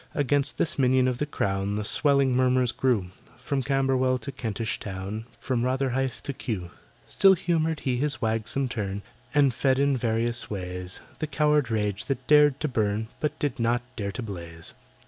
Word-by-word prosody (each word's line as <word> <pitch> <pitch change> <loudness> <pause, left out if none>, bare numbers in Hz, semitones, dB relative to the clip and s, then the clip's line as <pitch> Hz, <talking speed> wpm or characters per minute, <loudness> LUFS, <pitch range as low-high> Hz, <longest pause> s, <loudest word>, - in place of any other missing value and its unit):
Against 145 0 +1
this 165 -3 +1
minion 130 -1 +4
of 125 -1 -1
the 150 - -1
Crown 100 -6 -1
The 105 - -2
swelling 140 0 +3
murmurs 125 -1 +3
grew— 120 -7 0 0.3
From 140 -2 -2
Camberwell 130 -1 +1
to 125 - -5
Kentish 115 -3 -3
Town— 100 +3 -5
From 125 -3 -1
Rotherhithe 130 -1 0
to 140 - -3
Kew. 95 -9 -4 0.3
Still 195 -1 +5
humoured 165 -3 0
he 125 -2 0
his 145 +2 0
wagsome 115 +4 -1
turn, 100 -5 -4 0.3
And 140 -3 +4
fed 130 +3 +2
in 140 0 +3
various 115 0 0
ways 90 -2 -3 0.2
The 155 - -2
coward 150 -4 +2
rage 105 -2 -1
that 130 -2 -3
dared 150 -2 +5
to 155 - +1
burn, 110 -3 -1
But 150 - -2
did 140 -4 -2
not 120 +1 +1
dare 100 -4 -3
to 125 - -4
blaze. 85 -5 -3
125 Hz, 170 wpm, -26 LUFS, 105-140 Hz, 0.3 s, Still